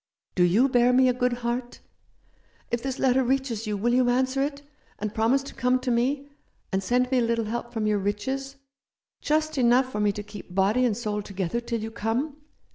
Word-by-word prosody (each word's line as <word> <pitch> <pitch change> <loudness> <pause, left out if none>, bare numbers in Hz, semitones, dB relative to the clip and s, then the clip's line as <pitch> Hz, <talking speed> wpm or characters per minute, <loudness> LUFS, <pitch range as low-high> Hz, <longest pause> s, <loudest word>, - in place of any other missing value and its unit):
Do 180 - +3
you 200 +10 +4
bear 245 -1 +4
me 255 0 +5
a - - +3
good 250 0 +1
heart? 240 +1 -3 0.9
If 235 - 0
this 265 +1 -3
letter 265 0 +3
reaches 250 -4 -1
you 210 -1 -1
will 240 +4 +1
you 250 0 +3
answer 260 +2 +1
it, 285 0 -2 0.3
and 210 0 -4
promise 235 +5 +2
to 275 - -9
come 250 +1 +2
to 255 0 -2
me, 270 +4 0 0.4
and 190 - 0
send 250 +5 +1
me 260 - +3
a - - +2
little 230 -1 0
help 235 +2 -4
from 225 -3 -2
your 210 -1 +2
riches, 260 +8 -3 0.7
just 310 -1 0
enough 250 +1 +4
for 210 - -3
me 210 -1 +3
to 210 - -6
keep 205 -3 -11
body 205 +6 +3
and 220 -4 0
soul 210 -3 -2
together 195 +2 -3
till 235 -1 -3
you 220 +1 -5
come 235 +7 -2
240 Hz, 205 wpm, -26 LUFS, 215-260 Hz, 0.9 s, me